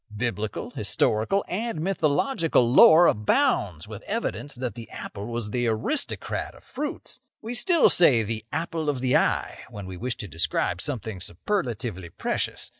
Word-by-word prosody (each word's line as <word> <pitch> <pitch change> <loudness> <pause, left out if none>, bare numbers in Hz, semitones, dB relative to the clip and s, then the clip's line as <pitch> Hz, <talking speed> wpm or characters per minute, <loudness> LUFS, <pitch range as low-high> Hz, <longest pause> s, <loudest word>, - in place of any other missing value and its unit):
Biblical, 110 0 -3
historical, 110 - 0
and 220 -1 -3
mythological 165 - +1
lore 160 +5 +8
abounds 105 - +1
with 105 -2 -8
evidences 195 - -3
that 125 -3 -3
the 115 0 -10
apple 100 +1 -7
was 115 -3 -4
the 120 +1 0
aristocrat 115 - -2
of - - -17
fruits. 290 -2 -6 0.2
We 225 +2 -6
still 335 +5 +4
say 130 -10 +5
'the 110 0 -4
apple 160 0 -2
of 140 -3 -1
the 130 0 +1
eye' - - +1
when 100 -2 -8
we 95 -1 -7
wish 125 +4 -3
to 105 - -6
describe 80 -2 -1
something 110 -8 -4
superlatively 110 - -3
precious. - - -3
125 Hz, 150 wpm, -25 LUFS, 105-175 Hz, 0.2 s, lore